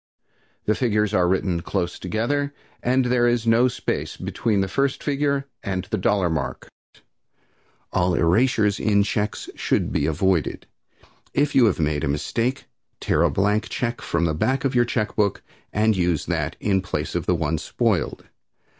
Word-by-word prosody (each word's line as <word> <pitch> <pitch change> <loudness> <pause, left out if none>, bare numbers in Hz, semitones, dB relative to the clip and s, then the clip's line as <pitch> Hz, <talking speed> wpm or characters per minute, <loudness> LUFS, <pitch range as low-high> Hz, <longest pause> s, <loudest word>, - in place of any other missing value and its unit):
The 105 - +3
figures 105 -3 +1
are 90 -3 +3
written 90 -2 0
close 90 -1 -2
together 140 +9 -1 0.3
and 130 +1 +2
there 120 -1 +3
is 120 -1 +1
no 115 +2 +5
space 125 - -3
between 105 -4 -1
the 95 - 0
first 140 +6 -1
figure 140 -1 0 0.2
and 95 -2 -2
the - - +1
dollar 95 -1 +2
mark. 80 -2 -3 1.3
All 90 -1 +2
erasures 105 +4 +2
in 100 -2 +3
checks 105 0 -2
should - - 0
be 75 - +1
avoided. 85 0 0 0.7
If 145 0 +2
you 130 - +6
have 100 -6 +1
made 75 -2 0
a - - 0
mistake, 115 - -1 0.3
tear - - +1
a - - +4
blank 105 +3 +1
check 120 -1 -2
from 85 0 0
the 80 - +1
back 130 - 0
of 135 - +1
your 120 -1 +4
check 110 -3 -2
book 105 -3 0 0.3
and 110 +1 +2
use 90 -4 0
that - - -2
in 95 -2 +1
place 90 - -3
of - - -2
the 90 - +3
one 80 -1 -1
spoiled. - - -1
105 Hz, 165 wpm, -23 LUFS, 90-120 Hz, 1.3 s, you